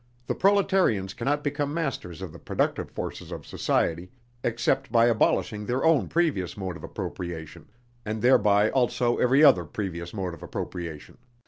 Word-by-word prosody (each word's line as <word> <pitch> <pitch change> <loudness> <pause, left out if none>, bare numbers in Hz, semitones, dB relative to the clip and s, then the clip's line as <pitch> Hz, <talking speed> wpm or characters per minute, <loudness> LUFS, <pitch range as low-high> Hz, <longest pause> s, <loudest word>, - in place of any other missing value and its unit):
The - - -1
proletarians 190 - +2
cannot 145 +1 -1
become 145 0 -2
masters 110 - -3
of 85 -5 -7
the - - -11
productive - - -1
forces - - -6
of - - -7
society, 85 +2 -1 0.3
except 120 +3 0
by 115 -1 +5
abolishing 105 -2 +1
their 125 +4 0
own 160 -4 +4
previous 150 - 0
mode 95 -3 -4
of - - -11
appropriation, 85 -3 -6 0.4
and 110 0 -3
thereby 105 -4 +4
also 125 -2 +1
every 130 +4 +4
other 130 - +7
previous 85 0 -5
mode 95 -4 -4
of - - -11
appropriation. 85 -2 -6
110 Hz, 150 wpm, -26 LUFS, 90-135 Hz, 0.4 s, other